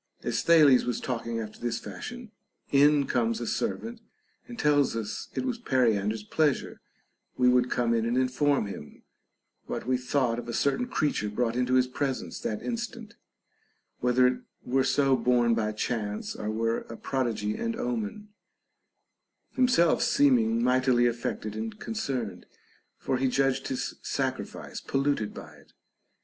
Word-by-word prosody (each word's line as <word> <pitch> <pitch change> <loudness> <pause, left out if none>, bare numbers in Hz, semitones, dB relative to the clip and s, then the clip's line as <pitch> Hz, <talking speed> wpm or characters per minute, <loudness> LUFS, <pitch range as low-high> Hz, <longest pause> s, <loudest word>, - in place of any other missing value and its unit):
As - - -1
Thales 150 -6 +6
was 125 - -2
talking 115 -2 -3
after 110 -1 -7
this 120 -1 -2
fashion, 240 - -8 0.4
in 145 0 +5
comes 115 -3 0
a 120 - -4
ser 230 - -1
vant 230 0 -9 0.5
and 240 -1 -9
tells 145 -4 +3
us 110 -2 -4
it - - -1
was 245 -3 -2
Periander's 110 - +1
pleasure 145 +4 0 0.6
we 125 - +4
would 125 0 +4
come 120 -2 +1
in 115 0 +1
and 120 +2 0
inform 130 0 +2
him 95 -7 -9 0.6
what - - -4
we 130 +1 +1
thought 125 -2 0
of 120 0 -7
a - - -3
certain 190 - +1
creature 145 - 0
brought 115 +2 -1
into 125 +1 +1
his 130 -1 +5
presence 130 +1 -3
that 105 - -3
instant, 235 -2 -5 0.9
whether 125 +1 +3
it 125 0 +2 0.3
were 130 +1 +2
so 135 -1 +3
born 120 -2 +3
by 110 -2 0
chance 105 -1 -3
or 105 - -4
were 115 +1 0
a 115 - -7
prodigy 115 -6 -1
and 230 -1 -2
omen; 220 -3 -3 0.6
— - - -52
himself 250 -11 +3
seeming 115 -5 +3
mightily 125 -1 +3
affected 115 -3 -2
and 110 +1 -5
concerned, 130 - -4 0.5
for 130 - -1
he 135 +1 +1
judged 135 +1 +1
his 130 - -3
sacrifice - - -4
polluted 135 -6 0
by - - -10
it. - - -22
125 Hz, 155 wpm, -28 LUFS, 115-145 Hz, 0.9 s, Thales